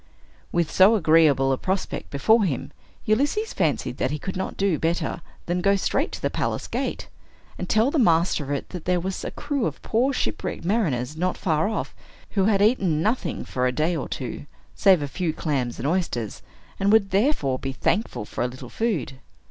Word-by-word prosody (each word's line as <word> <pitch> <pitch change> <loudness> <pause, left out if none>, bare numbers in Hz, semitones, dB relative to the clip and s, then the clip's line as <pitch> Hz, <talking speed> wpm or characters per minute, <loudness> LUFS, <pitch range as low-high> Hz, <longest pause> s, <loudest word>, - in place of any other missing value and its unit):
With 170 -2 0
so 195 +4 +6
agreeable 155 -7 +4
a 130 - 0
prospect 190 0 -3
before 215 +11 +3
him, 145 -10 -2 0.3
Ulysses 285 - +1
fancied - - 0
that - - 0
he 150 - -2
could 190 +6 -5
not 190 - -4
do 195 -6 +1
better 165 0 -1 0.2
than 175 +1 -1
go 200 +2 +4
straight 195 - 0
to - - -6
the - - +1
palace - - -2
gate, - - -3 0.5
and 180 - -4
tell 220 +5 +3
the 310 - +1
master 170 - +3
of - - -9
it 145 -1 -3
that 180 -4 -7
there 180 0 +2
was 185 +2 -4
a - - -3
crew 290 -5 -2
of - - -6
poor 245 +5 +1
shipwrecked 255 - -3
mariners, 155 - 0
not 180 +3 -1
far 160 +2 +1
off, 225 - -3 0.4
who 195 -2 +2
had 200 -1 +3
eaten 190 -9 +2
nothing 215 - -1
for 125 -1 0
a - - +1
day 155 +6 0
or 145 - -4
two, 130 +2 -5 0.3
save 185 -6 +4
a - - -2
few 165 +3 -2
clams 135 -7 -2
and 130 - -2
oysters, 150 - -2 0.4
and 200 +1 +3
would 210 -3 +4
therefore 190 - +1
be 135 - -3
thankful 170 - -1
for - - -3
a - - +1
little 125 0 -9
food. 155 - -2
175 Hz, 195 wpm, -24 LUFS, 145-205 Hz, 0.5 s, so